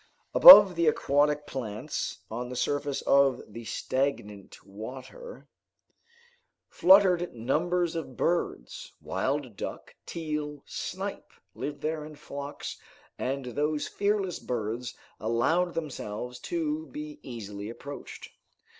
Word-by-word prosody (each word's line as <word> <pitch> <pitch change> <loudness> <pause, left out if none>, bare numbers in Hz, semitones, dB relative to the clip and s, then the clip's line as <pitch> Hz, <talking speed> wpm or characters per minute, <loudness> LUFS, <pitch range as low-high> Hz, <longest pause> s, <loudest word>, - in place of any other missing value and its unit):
Above 205 - +11
the 170 -1 +1
aquatic 150 0 +2
plants, 110 -7 -5
on 120 +2 -4
the 125 - -6
surface 145 +2 -1
of 140 -2 +4
the 115 +3 -9
stagnant 105 -7 -3
water, 130 - -10 1.2
fluttered 180 -4 +4
numbers 170 +8 0
of 145 -6 -6
birds. 165 - -2
Wild 135 -5 -2
duck, - - -7
teal, 150 -3 -4
snipe - - -6 0.2
lived 145 0 -6
there 155 0 -2
in 150 0 -10
flocks, 140 0 -7 0.4
and 135 +1 -2
those 150 +4 -1
fearless 200 -3 -1
birds 120 +1 -4 0.2
allowed 160 +11 +1
themselves 125 -6 -5
to 320 -2 -3
be 300 0 -8
easily 105 -3 -7
approached. 140 +4 -9
145 Hz, 105 wpm, -28 LUFS, 120-170 Hz, 1.2 s, Above